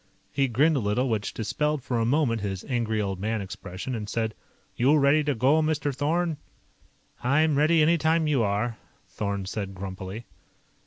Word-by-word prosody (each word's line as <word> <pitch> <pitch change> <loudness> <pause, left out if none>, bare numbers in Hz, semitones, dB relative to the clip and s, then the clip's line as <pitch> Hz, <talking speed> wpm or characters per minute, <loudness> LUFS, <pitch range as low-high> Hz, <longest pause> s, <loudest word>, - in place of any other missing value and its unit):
He 140 -1 +1
grinned 145 +7 +3
a - - +2
little, 115 +4 0
which 110 -2 -1
dispelled 150 +6 -1
for 120 -2 -1
a 115 - +1
moment 125 -5 +1
his 95 -2 -3
Angry 115 -5 -1
Old 95 -3 -2
Man 110 +3 -1
expression, 95 +4 -6
and 105 -3 -4
said: 110 -1 -1 0.4
"You 140 +6 +4
ready 145 +2 +4
to 145 -2 +1
go, 135 +7 +3
Mr. 155 -2 0
Thorn?" 160 +3 0 0.9
"I'm 150 +4 +3
ready 155 +2 +4
any 165 +2 +3
time 160 +1 +2
you 145 -5 +2
are," 110 +2 0 0.3
Thorn 100 -2 -3
said 100 0 -4
grumpily. 95 +3 -6
120 Hz, 170 wpm, -26 LUFS, 105-150 Hz, 0.9 s, You